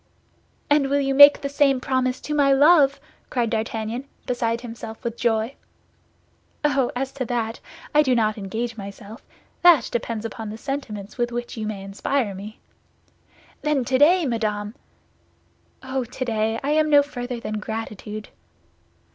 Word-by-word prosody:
"And 290 -2 +3
will 285 +1 +2
you 275 -1 0
make 285 +1 +9
the 280 - -2
same 280 -1 +2
promise 255 0 0
to 300 - -4
my 285 -2 +4
love?" 280 0 +5 0.3
cried 235 -3 -1
D'Artagnan, 225 +2 -3 0.2
beside 235 -2 -1
himself 230 -2 -8
with 235 -1 -3
joy. 230 +1 0 1.1
"Oh, 275 -4 +2
as 265 +1 -2
to 265 -2 -4
that, 230 -1 -2 0.3
I 300 - +6
do 260 -4 +2
not 215 -2 +2
engage 225 +3 -4
myself. 200 +2 -9 0.4
That 340 -8 +6
depends 230 -2 -3
upon 225 -1 -6
the 215 - -7
sentiments 220 -6 -6
with 240 0 0
which 240 0 -5
you 220 -2 -4
may 200 -3 -5
inspire 205 +3 -1
me." 205 +3 -9 1.0
"Then 295 -4 0
today, 295 +7 +4
madame—" 215 -4 -2 1.1
"Oh, 260 0 -2
today, 225 -2 -2
I 285 - 0
am 310 0 +3
no 290 -1 +6
further 245 -3 -5
than 215 -2 -4
gratitude." 215 -1 -6
240 Hz, 145 wpm, -23 LUFS, 220-275 Hz, 1.1 s, make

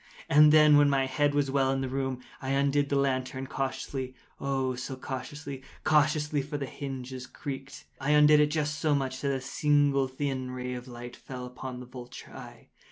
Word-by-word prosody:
And 150 +1 +7
then, 150 -1 +7
when 145 -1 +5
my 135 -1 +2
head 145 +2 +1
was 140 -2 +1
well 135 -1 +2
in 135 0 0
the 135 - -1
room, 130 -1 -3 0.2
I 130 - -4
undid 140 +1 +2
the 140 - +1
lantern 130 -1 0
cautiously—oh, 130 0 -3
so 130 +2 -5
cautiously—cautiously 145 +3 -1
(for 145 +2 -5
the 140 - -3
hinges 130 -2 -6
creaked)—I 135 0 -7
undid 150 0 +7
it 150 0 +4
just 150 0 -1
so 155 -2 +2
much 130 -2 -2
that 140 - 0
a 135 - -1
single 140 0 +2
thin 130 -1 -3
ray 125 0 -4 0.4
fell 125 0 -8
upon 125 0 -7
the - - -8
vulture 125 -1 -10
eye. - - -11
135 Hz, 165 wpm, -29 LUFS, 130-145 Hz, 0.4 s, And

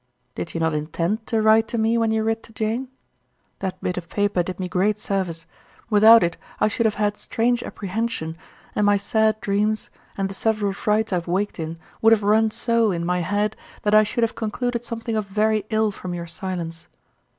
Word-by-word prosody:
Did 90 - -6
you - - -1
not 160 -1 +1
intend 165 +8 -2
to 225 -2 +1
write 220 +1 +5
to 235 - -3
me 225 +1 +2
when 230 -1 +2
you 220 0 +1
writ 225 0 0
to - - -15
Jane? 225 +4 -2 0.7
That 190 -1 -4
bit 180 - -1
of 170 -1 -14
paper 205 -3 +1
did 180 +2 -5
me 185 - -2
great 195 +4 +1
service; 185 -6 -2 0.5
without 220 +2 +8
it 170 -1 -1 0.2
I - - +4
should 230 +2 +1
have 215 - -1
had 205 0 0
strange 240 +1 0
apprehension, 195 -5 -3 0.4
and 210 - +1
my 205 0 +5
sad 220 +1 +1
dreams, 210 +2 0 0.3
and 195 -1 0
the 195 - -7
several 210 -1 0
frights 210 +1 0
I - - +3
have 170 - -5
waked 190 +2 -1
in, 160 +1 -4 0.2
would 225 +1 +7
have 215 -2 +2
run 220 +2 +4
so 230 0 +1
in 170 -3 -1
my 180 +1 +1
head 205 +4 0 0.3
that 210 - +1
I 215 - +8
should 215 +2 0
have 230 - +1
concluded 235 +2 -2
something 230 -1 -4
of 215 -2 -1
very 215 +1 +1
ill 220 -1 +2
from 180 -2 -6
your 170 -1 -5
silence. 170 -1 -5
210 Hz, 205 wpm, -23 LUFS, 185-220 Hz, 0.7 s, without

